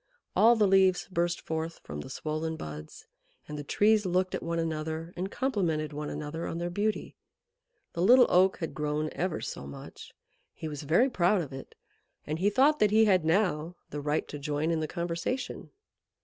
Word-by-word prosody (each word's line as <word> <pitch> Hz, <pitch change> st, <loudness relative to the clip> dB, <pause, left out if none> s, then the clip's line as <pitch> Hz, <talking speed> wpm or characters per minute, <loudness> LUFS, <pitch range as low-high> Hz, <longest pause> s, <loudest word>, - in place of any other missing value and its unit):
All 235 Hz, +2 st, +6 dB
the 215 Hz, -2 st, +3 dB
leaves 190 Hz, -1 st, +4 dB
burst 175 Hz, 0 st, 0 dB
forth 160 Hz, +1 st, -4 dB
from 75 Hz, -, -7 dB
the -, -, -9 dB
swollen 155 Hz, +3 st, -3 dB
buds, 75 Hz, -, -8 dB, 0.4 s
and 150 Hz, -, -6 dB
the 145 Hz, -, -5 dB
Trees 210 Hz, +7 st, +3 dB
looked 185 Hz, 0 st, 0 dB
at -, -, -2 dB
one 170 Hz, 0 st, -2 dB
another 160 Hz, +1 st, -3 dB
and 185 Hz, +2 st, -3 dB
complimented 175 Hz, -, -1 dB
one 150 Hz, 0 st, -4 dB
another 150 Hz, +2 st, -5 dB
on 165 Hz, -, -4 dB
their 175 Hz, +1 st, -3 dB
beauty. 210 Hz, +4 st, -2 dB, 0.8 s
The 170 Hz, -, -3 dB
Little 245 Hz, +6 st, +7 dB
Oak 185 Hz, +2 st, +4 dB
had 165 Hz, -, -4 dB
grown 150 Hz, 0 st, -1 dB
ever 180 Hz, -2 st, -2 dB
so 70 Hz, -, -6 dB
much. 70 Hz, -, -10 dB, 0.4 s
He 160 Hz, -, -6 dB
was 150 Hz, -2 st, -5 dB
very 170 Hz, -, +3 dB
proud 180 Hz, -1 st, +2 dB
of 140 Hz, -, -9 dB
it, 135 Hz, -, -9 dB, 0.5 s
and 155 Hz, +2 st, -3 dB
he 195 Hz, +3 st, +3 dB
thought 280 Hz, +8 st, +4 dB
that 210 Hz, -, +4 dB
he 220 Hz, +2 st, +5 dB
had 185 Hz, -5 st, +4 dB
now 165 Hz, -1 st, +1 dB, 0.2 s
the 145 Hz, -, -4 dB
right 150 Hz, +1 st, -1 dB
to 145 Hz, -, -6 dB
join 150 Hz, +2 st, -1 dB
in 165 Hz, -, +1 dB
the 155 Hz, -, -2 dB
conversation. 170 Hz, -, -3 dB
170 Hz, 190 wpm, -29 LUFS, 155-190 Hz, 0.8 s, Little